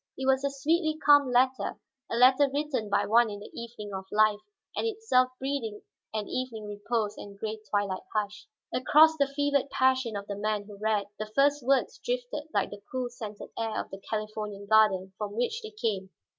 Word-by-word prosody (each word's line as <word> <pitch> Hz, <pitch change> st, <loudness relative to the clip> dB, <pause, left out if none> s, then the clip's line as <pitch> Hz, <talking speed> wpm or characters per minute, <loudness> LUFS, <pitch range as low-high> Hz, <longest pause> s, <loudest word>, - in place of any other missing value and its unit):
It 265 Hz, -, -3 dB
was 265 Hz, 0 st, +3 dB
a 280 Hz, -, +2 dB
sweetly 310 Hz, +3 st, +1 dB
calm 290 Hz, -2 st, +7 dB
letter, 250 Hz, -3 st, +2 dB, 0.3 s
a -, -, -2 dB
letter 260 Hz, +3 st, +6 dB
written 280 Hz, -7 st, -2 dB
by 200 Hz, -, +2 dB
one 235 Hz, +1 st, +4 dB
in 205 Hz, -1 st, -6 dB
the 205 Hz, -, -11 dB
evening 225 Hz, -3 st, -7 dB
of 190 Hz, 0 st, -5 dB
life 215 Hz, -1 st, +4 dB, 0.4 s
and -, -, 0 dB
itself 420 Hz, -, +2 dB
breathing 260 Hz, -6 st, -3 dB, 0.3 s
an 215 Hz, -2 st, -3 dB
evening 240 Hz, -4 st, -4 dB
repose 210 Hz, +1 st, -2 dB
and 200 Hz, -1 st, -10 dB
gray 220 Hz, +1 st, -4 dB
twilight 200 Hz, -2 st, 0 dB
hush. 210 Hz, -1 st, -3 dB, 0.3 s
Across 310 Hz, +5 st, +5 dB
the 280 Hz, -2 st, +3 dB
fevered 280 Hz, 0 st, 0 dB
passion 260 Hz, -4 st, +2 dB
of 200 Hz, 0 st, -4 dB
the 200 Hz, -, -5 dB
man 210 Hz, 0 st, -1 dB
who 205 Hz, 0 st, -11 dB
read, 215 Hz, -1 st, +1 dB
the 215 Hz, -, -3 dB
first 285 Hz, +1 st, +4 dB
words 270 Hz, +2 st, +1 dB
drifted -, -, -3 dB
like -, -, 0 dB
the 205 Hz, 0 st, -9 dB
cool, 255 Hz, -2 st, -2 dB
scented 215 Hz, -4 st, -8 dB
air 225 Hz, -1 st, -2 dB
of -, -, -5 dB
the 195 Hz, 0 st, -8 dB
Californian 215 Hz, -2 st, -4 dB
garden 200 Hz, -3 st, +4 dB
from 205 Hz, -1 st, -3 dB
which 345 Hz, -, -1 dB
they 435 Hz, -, -7 dB
came. 210 Hz, -, -2 dB
230 Hz, 190 wpm, -28 LUFS, 210-275 Hz, 0.4 s, calm